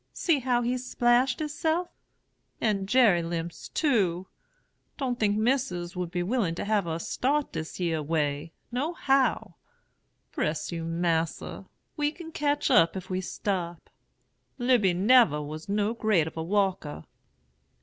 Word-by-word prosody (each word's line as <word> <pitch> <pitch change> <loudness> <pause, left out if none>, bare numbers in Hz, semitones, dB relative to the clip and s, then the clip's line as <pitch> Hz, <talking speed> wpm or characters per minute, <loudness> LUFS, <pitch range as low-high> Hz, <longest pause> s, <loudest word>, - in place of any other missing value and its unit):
See 330 -5 +1
how 245 -1 +1
he's 250 +1 -1
splashed 245 0 +2
hisself! 315 +3 -1 0.7
and 200 -3 0
Jerry 220 -9 +5
limps, 165 0 -5
too. 195 - +1 0.7
Don't 255 -4 -2
think 205 -1 +2
Missis 215 -7 0
would 180 -1 -3
be 175 0 -2
willing 195 -4 0
to - - -4
have 205 -4 +1
us 165 0 -3
start 285 +3 0
dis 160 +2 -6
yere 165 -3 0
way, 150 0 -1 0.2
no 280 +8 -1
how. 260 - +1 0.7
Bress 150 +3 -2
you, 165 -1 -4
Mas'r, 165 -1 -2 0.3
we 295 0 +1
can 325 0 -10
ketch 295 -1 0
up, 165 +2 +5
if 185 0 -8
we 185 0 -1
stop. 175 -3 -4 0.7
Lizy 240 -8 +3
nebber 205 - +5
was 155 +4 -8
no 210 +2 +1
great 215 -8 +2
of 160 - -7
a 160 - -3
walker.' 190 -3 -1
200 Hz, 140 wpm, -27 LUFS, 170-250 Hz, 0.7 s, Jerry